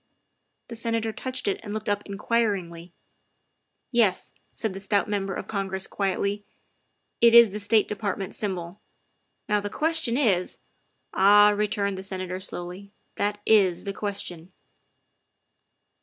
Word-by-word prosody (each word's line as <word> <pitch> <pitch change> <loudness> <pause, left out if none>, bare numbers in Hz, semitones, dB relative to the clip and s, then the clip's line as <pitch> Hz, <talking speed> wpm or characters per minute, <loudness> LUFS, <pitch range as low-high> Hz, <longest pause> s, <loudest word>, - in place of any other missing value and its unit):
The 235 - -6
Senator 230 -1 0
touched 255 0 -4
it 200 - 0
and 210 -1 -6
looked 215 0 -5
up 205 0 0
in 200 -1 -6
quiringly. 190 -8 -1 0.5
" - - -43
Yes," 195 -5 +1 0.2
said 220 -4 -2
the 195 - -6
stout 200 +1 0
Member 195 -2 -2
of - - -5
Congress 195 -2 -3
quietly, 200 0 -1
60 - - -27
THE - - -39 0.8
WIFE 230 - +5
OF - - +7
"it - - +12
is 235 -2 +8
the 210 - -5
State 210 +1 +2
Department 200 -2 -3
symbol. 185 -2 -4 0.7
Now 210 0 +2
the 205 0 -4
ques 320 +7 0
tion 240 -6 -1
is 195 -10 +1 0.3
" - - -46 0.2
"Ah," 205 +2 +7
returned 205 -2 -1
the - - -5
Senator 185 -1 -5
slowly, 185 +1 -7
" - - -45
that 205 0 -1
is 195 -5 +4
the 200 - -4
question. 190 -4 -5
205 Hz, 165 wpm, -26 LUFS, 190-215 Hz, 0.8 s, it